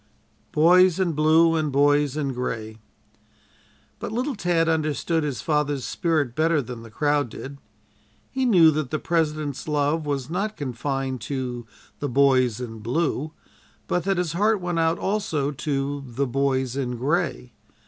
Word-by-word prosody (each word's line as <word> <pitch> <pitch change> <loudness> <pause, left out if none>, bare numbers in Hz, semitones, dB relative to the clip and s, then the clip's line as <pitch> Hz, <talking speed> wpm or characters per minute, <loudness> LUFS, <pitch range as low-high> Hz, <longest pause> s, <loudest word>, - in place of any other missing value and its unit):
"BOYS 180 +3 +5
IN 180 -3 +1
BLUE" 160 +2 +4
AND 155 -2 0
"BOYS 145 0 +3
IN 140 -3 -1
GRAY" 110 -3 -4 1.2
But - - -5
little 255 +6 -1
Tad 175 -4 +1
understood 160 0 0
his 145 -4 -3
father's 150 -3 0
spirit 155 -8 0
better 160 0 +2
than 125 -3 -6
the 115 - -11
crowd 145 +3 0
did. 140 +5 -9 0.7
He 265 0 -1
knew 170 -8 +6
that 150 -3 -2
the 155 - -1
President's 155 -4 -1
love 150 +1 0
was 140 -3 -2
not 200 +6 -3
confined 135 -1 -3
to 125 -4 -4 0.3
"the 145 - -2
Boys 130 -3 +3
in 115 -3 -6
Blue," 150 +5 -1 0.5
but 180 - -1
that 195 -1 +1
his 175 -3 -1
heart 210 +4 +2
went 175 -2 -2
out 165 +1 +2
also 165 -9 -1
to 140 -1 -2
"the 130 +3 -1
Boys 130 -1 0
in 125 -3 -2
Gray." 145 -1 -1
145 Hz, 150 wpm, -24 LUFS, 135-165 Hz, 1.2 s, knew